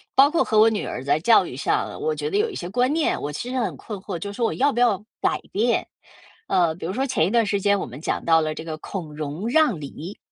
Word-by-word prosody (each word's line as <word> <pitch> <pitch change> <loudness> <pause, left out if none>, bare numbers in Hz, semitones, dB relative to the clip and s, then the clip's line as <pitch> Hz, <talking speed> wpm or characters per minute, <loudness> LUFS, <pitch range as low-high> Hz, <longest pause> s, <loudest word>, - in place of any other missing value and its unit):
包 280 +2 +6
括 340 - +3
和 215 -1 +2
我 220 - +7
女 215 -2 -2
儿 125 - -5
在 145 +2 +2
教 225 +8 +5
育 - - -7
上， - - -1
我 465 +1 0
觉 445 - -3
得 410 - 0
有 435 +2 +2
一 - - -8
些 175 - -5
观 250 +6 +1
念， 315 0 0
我 145 - -3
其 240 +11 -5
实 260 - -1
很 230 - -2
困 210 -3 -7
惑， 190 -3 -5
就 200 +4 -5
是 - - -10
说 235 0 0
我 - - 0
要 280 +2 +2
不 240 - -2
要 235 -5 +4 0.2
改 - - +1
变。 230 +4 +1 0.6
呃， 170 -3 +2
比 170 - -7
如 175 - -2
说 265 +4 0
前 250 -11 +2
一 - - -2
段 230 -2 +3
时 200 -1 0
间 200 0 +3
我 - - -3
们 130 +5 -10
讲 - - -2
到 165 -1 +5
了 155 0 -1
这 160 - -7
个 155 -1 -5
“孔 160 -6 -6
融 155 +7 -4
让 255 - +3
梨”， 155 +6 -8
205 Hz, 310 characters per minute, -23 LUFS, 165-250 Hz, 0.6 s, 我